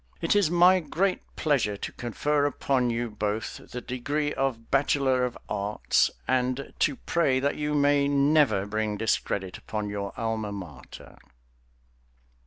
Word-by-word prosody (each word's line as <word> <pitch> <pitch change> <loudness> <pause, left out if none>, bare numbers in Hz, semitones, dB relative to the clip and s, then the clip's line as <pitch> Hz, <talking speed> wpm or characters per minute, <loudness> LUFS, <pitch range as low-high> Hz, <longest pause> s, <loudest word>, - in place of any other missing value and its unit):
It 165 - +1
is 200 -6 +4
my 175 +2 +6
great 180 +4 -1
pleasure 130 -9 +1
to - - -5
confer 145 +5 0
upon 130 -3 0
you 120 +1 -1
both 105 +1 -3
the 125 - -6
degree 140 +5 -2
of 125 -4 -2
bachelor 135 -2 +2
of 125 - -5
arts 105 0 +1 0.2
and 130 +1 0
to 145 - +2
pray 140 -3 +1
that 140 +2 0
you 150 0 -2
may 145 -1 +3
never 140 -7 +3
bring 105 0 -2
discredit 100 -3 -1
upon 105 -1 -4
your 100 -1 -4
alma 110 -2 -2
mater. 85 -10 -10
130 Hz, 140 wpm, -27 LUFS, 110-145 Hz, 0.2 s, my